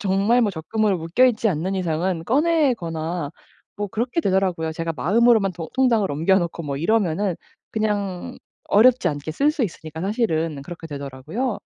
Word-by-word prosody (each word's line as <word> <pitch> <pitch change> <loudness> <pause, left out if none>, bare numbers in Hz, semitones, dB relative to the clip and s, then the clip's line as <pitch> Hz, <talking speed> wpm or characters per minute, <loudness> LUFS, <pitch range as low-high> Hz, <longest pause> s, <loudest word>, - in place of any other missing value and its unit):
정말 200 +5 +2
뭐 210 - +2
적금으로 195 +3 -1
묶여 165 +10 +2
있지 225 -2 +1
않는 185 +3 -1
이상은 170 -1 -1
꺼내거나 180 - 0 0.5
뭐 205 0 -2
그렇게 240 - -1
되더라고요. 185 - 0
제가 165 +1 -3
마음으로만 210 - +3
도 165 -2 -7
통장을 235 -6 +3
옮겨 165 +7 +3
놓고 170 -1 -4
뭐 140 -2 -3
이러면은 195 -1 +1 0.4
그냥 205 -4 -2 0.3
어렵지 235 0 +5
않게 145 0 -4
쓸 285 - +2
수 295 - -2
있으니까 160 -4 -7
사실은 165 - -1
그렇게 170 +1 -9
되더라고요. 145 - -4
190 Hz, 375 characters per minute, -22 LUFS, 160-225 Hz, 0.5 s, 어렵지